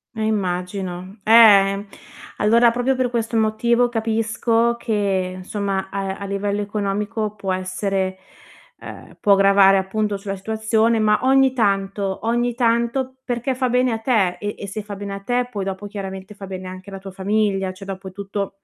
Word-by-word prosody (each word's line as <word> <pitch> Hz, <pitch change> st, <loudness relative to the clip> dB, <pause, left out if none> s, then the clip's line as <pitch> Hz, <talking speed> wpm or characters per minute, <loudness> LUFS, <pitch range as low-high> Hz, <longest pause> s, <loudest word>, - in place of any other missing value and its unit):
Eh, 220 Hz, -, -4 dB
immagino. 185 Hz, -1 st, -3 dB
Ehm, 205 Hz, -3 st, +6 dB, 0.5 s
allora 235 Hz, +3 st, +5 dB
proprio 245 Hz, +3 st, 0 dB
per 255 Hz, -1 st, 0 dB
questo 230 Hz, -1 st, -2 dB
motivo 235 Hz, +2 st, +2 dB
capisco 225 Hz, +1 st, 0 dB
che 195 Hz, -5 st, -1 dB
insomma 195 Hz, 0 st, -3 dB
a 195 Hz, -1 st, -3 dB
a 200 Hz, -, -6 dB
livello 200 Hz, +1 st, -2 dB
economico 210 Hz, +1 st, -2 dB
può 200 Hz, -2 st, -4 dB
essere 185 Hz, 0 st, -2 dB, 0.6 s
ehm, -, -, -11 dB
può 205 Hz, -, +4 dB
gravare 195 Hz, 0 st, +5 dB
appunto 205 Hz, +2 st, -1 dB
sulla 195 Hz, 0 st, -5 dB
situazione, 220 Hz, +2 st, +1 dB
ma 210 Hz, 0 st, +3 dB
ogni 265 Hz, 0 st, +4 dB
tanto 195 Hz, -3 st, 0 dB
ogni 240 Hz, +1 st, +1 dB
tanto 235 Hz, +2 st, 0 dB
perché 245 Hz, +2 st, -2 dB
fa 255 Hz, 0 st, 0 dB
bene 250 Hz, 0 st, +2 dB
a 225 Hz, -, -1 dB
te 220 Hz, -6 st, +1 dB
e 205 Hz, 0 st, -3 dB
e 200 Hz, -, -7 dB
se 210 Hz, +2 st, -5 dB
fa 205 Hz, -1 st, -7 dB
bene 200 Hz, 0 st, -6 dB
a -, -, -6 dB
te 245 Hz, +4 st, 0 dB
poi 200 Hz, -4 st, -3 dB
dopo 195 Hz, +1 st, -5 dB
chiaramente 195 Hz, 0 st, -7 dB
fa 200 Hz, -1 st, -9 dB
bene 185 Hz, -1 st, -7 dB
anche 185 Hz, +2 st, -9 dB
alla 195 Hz, -, -7 dB
tua 195 Hz, 0 st, -9 dB
famiglia, 195 Hz, 0 st, 0 dB
cioè, 195 Hz, +1 st, -11 dB
dopo 190 Hz, -1 st, -7 dB
tutto 200 Hz, 0 st, -5 dB
205 Hz, 165 wpm, -21 LUFS, 195-225 Hz, 0.6 s, Ehm